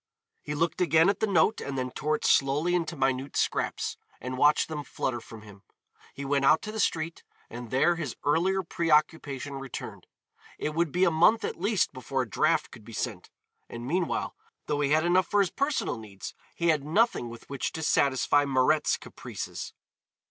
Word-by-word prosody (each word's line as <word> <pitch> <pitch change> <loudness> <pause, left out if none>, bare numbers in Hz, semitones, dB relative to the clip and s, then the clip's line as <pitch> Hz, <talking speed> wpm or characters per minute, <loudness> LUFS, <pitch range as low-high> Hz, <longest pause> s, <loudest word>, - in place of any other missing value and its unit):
He 150 - -5
looked 165 +3 0
again 165 0 +5
at 200 - 0
the 220 - +1
note 195 +2 +3
and 140 -1 -4
then 130 -1 -2
tore 155 +4 -1
it - - -5
slowly 145 +6 +3
into 170 -1 -1
minute 135 -1 -1
scraps, - - -1 0.2
and 130 +1 -5
watched 145 +3 +4
them 150 -2 -5
flutter 120 -3 -3
from 110 -1 -12
him. 100 -2 -14 0.5
He 140 - -6
went 140 0 +1
out 155 +3 +5
to 215 - -5
the 220 - -5
street 165 -4 -1 0.3
and 120 0 -7
there 135 +8 +3
his 150 -7 -4
earlier 185 +6 +2
preoccupation 150 -4 0
returned. 135 -2 -8 0.5
It 150 - -3
would 165 -1 0
be 180 +4 +1
a 180 - +4
month 175 +8 +4
at - - -5
least 200 -5 +1
before 130 +1 -2
a - - -8
draft 95 - +1
could - - -13
be - - -12
sent, - - -4 0.4
and 120 0 -7
meanwhile, 170 +5 -1 0.3
though 145 -1 -1
he 140 - +1
had 155 +2 +3
enough 180 0 +3
for 205 - +2
his 195 -3 +2
personal 280 - -1
needs, 100 -3 -9 0.2
he 170 0 +1
had 155 -3 +2
nothing 160 - +1
with 115 0 -11
which 140 -2 -3
to 160 - -4
satisfy 140 -1 +3
Mirette's 140 +2 +2
caprices. - - -7
150 Hz, 190 wpm, -28 LUFS, 135-170 Hz, 0.5 s, again